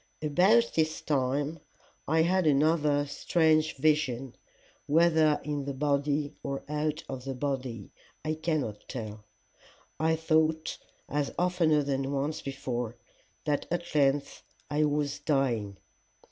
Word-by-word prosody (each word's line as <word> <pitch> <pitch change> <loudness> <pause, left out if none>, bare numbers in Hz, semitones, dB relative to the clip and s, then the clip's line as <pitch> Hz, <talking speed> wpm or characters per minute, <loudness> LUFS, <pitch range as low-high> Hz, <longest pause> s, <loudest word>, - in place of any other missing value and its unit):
"'About 185 +10 +4
this 160 -1 +1
time 145 +3 -1 0.5
I 160 +2 +3
had 180 0 +2
another 150 0 +3
strange 155 +1 +2
vision, 135 -4 +1 0.5
whether 160 -1 +4
in 145 -2 -3
the 140 -1 -4
body 145 +1 0
or 140 -1 -4
out 150 +1 -2
of 130 -2 -6
the 135 0 -4
body, 125 -6 -3 0.3
I 155 - 0
cannot 155 -9 -2
tell. 110 -4 -6 0.8
I 160 +1 +2
thought, 160 0 +1 0.3
as 145 -1 -1
oftener 170 -4 +2
than 135 -1 -1
once 145 +3 -2
before, 125 -4 -4 0.5
that 150 -2 0
at 175 0 -3
length 140 -1 +1 0.3
I 150 +1 +3
was 145 -1 -1
dying. 125 -9 0
145 Hz, 120 wpm, -29 LUFS, 135-155 Hz, 0.8 s, About